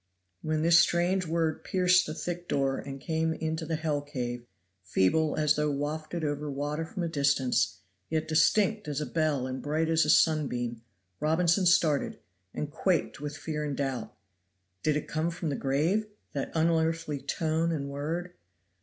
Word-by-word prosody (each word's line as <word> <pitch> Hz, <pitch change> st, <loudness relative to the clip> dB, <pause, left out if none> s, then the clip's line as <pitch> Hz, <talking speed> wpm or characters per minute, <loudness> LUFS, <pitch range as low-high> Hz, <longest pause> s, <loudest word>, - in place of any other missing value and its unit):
When 155 Hz, 0 st, -1 dB
this 170 Hz, +1 st, +7 dB
strange 175 Hz, +1 st, +2 dB
word 160 Hz, -1 st, 0 dB
pierced 180 Hz, -1 st, +3 dB
the 155 Hz, -, -4 dB
thick 175 Hz, 0 st, -4 dB
door 135 Hz, -1 st, 0 dB
and 135 Hz, 0 st, -7 dB
came 160 Hz, +1 st, -1 dB
into 160 Hz, 0 st, -3 dB
the 165 Hz, -, 0 dB
hell 155 Hz, -2 st, -1 dB
cave, 120 Hz, -4 st, -5 dB, 0.4 s
feeble 120 Hz, -, +2 dB
as 150 Hz, -1 st, +3 dB
though 150 Hz, 0 st, +1 dB
wafted 155 Hz, +3 st, -3 dB
over 145 Hz, 0 st, -2 dB
water 145 Hz, +3 st, -2 dB
from 185 Hz, +1 st, -4 dB
a -, -, 0 dB
distance, 135 Hz, -6 st, +1 dB, 0.3 s
yet 155 Hz, -1 st, -1 dB
distinct 210 Hz, +5 st, +3 dB
as 145 Hz, -1 st, -2 dB
a 150 Hz, -, -2 dB
bell 155 Hz, -5 st, 0 dB
and 130 Hz, 0 st, -4 dB
bright 155 Hz, +2 st, 0 dB
as 165 Hz, 0 st, +4 dB
a 150 Hz, -, -1 dB
sunbeam, 125 Hz, -8 st, +2 dB, 0.4 s
Robinson 170 Hz, +4 st, +3 dB
started, 160 Hz, -5 st, +3 dB, 0.3 s
and 150 Hz, +7 st, -4 dB
quaked 170 Hz, -3 st, 0 dB
with 145 Hz, 0 st, -5 dB
fear 150 Hz, -1 st, -3 dB
and 145 Hz, -2 st, -3 dB
doubt. 135 Hz, -4 st, -2 dB, 0.7 s
Did 155 Hz, -, +1 dB
it 150 Hz, -, -4 dB
come 160 Hz, +1 st, -1 dB
from 165 Hz, -1 st, -3 dB
the 140 Hz, -, -1 dB
grave, 160 Hz, +12 st, +1 dB, 0.3 s
that 140 Hz, -, -3 dB
unearthly 160 Hz, -2 st, +1 dB
tone 160 Hz, +1 st, 0 dB
and 145 Hz, -4 st, -2 dB
word? 160 Hz, +6 st, -4 dB
155 Hz, 165 wpm, -29 LUFS, 145-165 Hz, 0.7 s, this